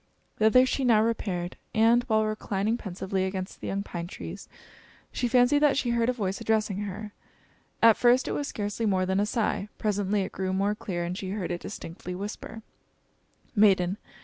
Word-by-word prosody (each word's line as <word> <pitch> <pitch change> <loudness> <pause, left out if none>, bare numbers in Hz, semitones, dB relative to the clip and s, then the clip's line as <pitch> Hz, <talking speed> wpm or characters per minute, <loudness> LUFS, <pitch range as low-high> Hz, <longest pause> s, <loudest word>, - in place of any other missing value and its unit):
Thither 220 +4 +5
she 265 +1 -1
now 225 -4 +5
repaired, 185 -6 -2 0.2
and, 230 +2 +5
while 220 -1 +2
reclining 215 0 -1
pensively 190 -3 -3
against 190 0 -4
the - - -5
young 200 +1 -2
pine 170 -3 -5
tree, - - -7 0.8
she 245 - -1
fancied 245 +4 +4
that 295 -2 +3
she 245 -4 0
heard 235 0 +2
a - - +4
voice 195 -6 -3
addressing 215 -3 0
her. 205 +2 -7 0.7
At 230 -1 +7
first 245 +1 +4
it - - -1
was 290 - -2
scarcely 210 +2 -2
more 185 -2 +2
than 190 +1 0
a 205 - +1
sigh; 210 -2 -1
presently 205 -1 0
it 190 - -5
grew 190 0 -2
more 200 +2 +1
clear, 180 -4 -4
and 175 +1 -3
she 190 0 -5
heard 195 -3 -3
it 175 - -3
distinctly 180 +2 -7
whisper 210 +3 -7 0.9
"Maiden! 195 -3 +4
205 Hz, 180 wpm, -27 LUFS, 190-230 Hz, 0.9 s, At